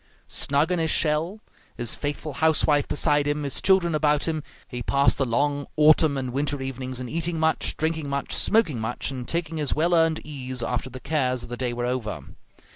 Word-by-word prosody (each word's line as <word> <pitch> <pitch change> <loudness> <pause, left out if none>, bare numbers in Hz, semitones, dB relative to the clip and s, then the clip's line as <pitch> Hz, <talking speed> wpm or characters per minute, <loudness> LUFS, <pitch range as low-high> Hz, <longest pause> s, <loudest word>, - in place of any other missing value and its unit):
Snug 145 +5 +2
in 180 - +1
his 160 -1 0
shell, 165 +8 0 0.3
his 120 -1 0
faithful 145 +1 -4
housewife 150 0 +2
beside 145 0 +2
him, 145 0 -1
his 140 -2 0
children 185 -3 +3
about 150 0 +2
him, 160 -1 -1 0.3
he 125 -1 -6
passed 140 +3 +2
the 135 - +1
long 145 +4 0
autumn 155 -1 +5
and 130 -2 -4
winter 145 +1 -1
evenings 130 -1 -5
in 125 - -5
eating 165 +4 -1
much, 160 0 +1
drinking 160 -2 -2
much, 140 0 -2
smoking 195 - +2
much, 110 +4 -2
and 125 -2 -6
taking 165 -1 -2
his 150 -3 0
well 170 +3 +1
earned 165 -1 +3
ease 130 -4 -5
after 125 +2 -2
the 130 +1 -9
cares 130 -4 -1
of 120 - -10
the 120 - -4
day 125 -1 -1
were 120 0 -3
over. 125 -4 -3
145 Hz, 200 wpm, -25 LUFS, 130-160 Hz, 0.3 s, autumn